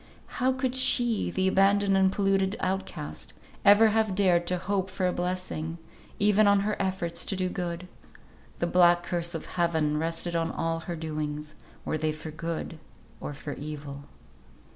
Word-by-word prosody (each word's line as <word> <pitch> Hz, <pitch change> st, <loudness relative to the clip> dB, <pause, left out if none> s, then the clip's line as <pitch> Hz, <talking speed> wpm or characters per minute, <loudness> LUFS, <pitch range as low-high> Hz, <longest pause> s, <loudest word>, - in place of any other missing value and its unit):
How 260 Hz, +1 st, +4 dB
could 260 Hz, -1 st, -1 dB
she, 240 Hz, -3 st, +4 dB
the 190 Hz, 0 st, 0 dB
abandoned 195 Hz, +1 st, +3 dB
and 190 Hz, 0 st, +4 dB
polluted 195 Hz, 0 st, +1 dB
outcast, 185 Hz, -, -4 dB, 0.3 s
ever 205 Hz, +2 st, +7 dB
have 215 Hz, -2 st, +1 dB
dared 180 Hz, -3 st, +3 dB
to 180 Hz, -, +1 dB
hope 190 Hz, +1 st, -2 dB
for 190 Hz, 0 st, -2 dB
a 180 Hz, -, +1 dB
blessing, 175 Hz, -2 st, -3 dB, 0.4 s
even 210 Hz, +1 st, +4 dB
on 200 Hz, -1 st, +4 dB
her 210 Hz, +1 st, -1 dB
efforts 185 Hz, -3 st, -1 dB
to 195 Hz, -, -1 dB
do 185 Hz, -1 st, -1 dB
good? 175 Hz, -1 st, -4 dB, 0.7 s
The -, -, 0 dB
black 175 Hz, 0 st, +4 dB
curse 170 Hz, -1 st, -2 dB
of 160 Hz, -, -5 dB
Heaven 160 Hz, -4 st, 0 dB
rested 165 Hz, +1 st, -2 dB
on 165 Hz, 0 st, 0 dB
all 165 Hz, 0 st, -2 dB
her 170 Hz, +1 st, -5 dB
doings, 150 Hz, -1 st, -4 dB, 0.3 s
were 155 Hz, -, -2 dB
they 155 Hz, 0 st, 0 dB
for 155 Hz, +1 st, -8 dB
good 165 Hz, 0 st, -5 dB, 0.4 s
or 145 Hz, -, -6 dB
for 145 Hz, +1 st, -6 dB
evil. 145 Hz, -1 st, -7 dB
175 Hz, 165 wpm, -27 LUFS, 160-195 Hz, 0.7 s, ever